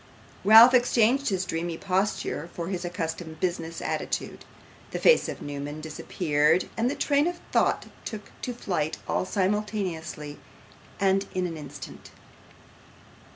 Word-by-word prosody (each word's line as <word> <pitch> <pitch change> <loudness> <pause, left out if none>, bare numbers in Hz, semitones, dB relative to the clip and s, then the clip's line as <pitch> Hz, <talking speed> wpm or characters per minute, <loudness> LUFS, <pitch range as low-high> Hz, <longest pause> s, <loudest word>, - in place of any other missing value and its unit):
Ralph 225 +5 +9
exchanged 245 +2 +3
his 190 -2 -1
dreamy 170 -1 -3
posture 190 -4 -1
for 170 0 -4
his 185 -2 -3
accustomed 165 -2 -4
business 165 -2 -2
attitude: - - -3 0.4
the - - -4
face 485 - +4
of - - -6
Newman 145 +1 -5
disappeared, 155 +1 +1
and 230 +2 +1
the 280 - -2
train 285 +2 +2
of 350 0 -3
thought - - +2 0.2
took 210 -2 -7
to 250 - -3
flight, 175 -10 -2
all - - 0
simultaneously, 185 -7 -2 0.6
and 195 0 +2
in 185 0 0
an 170 -2 -4
instant. 150 -2 -9
180 Hz, 130 wpm, -27 LUFS, 160-210 Hz, 0.6 s, Ralph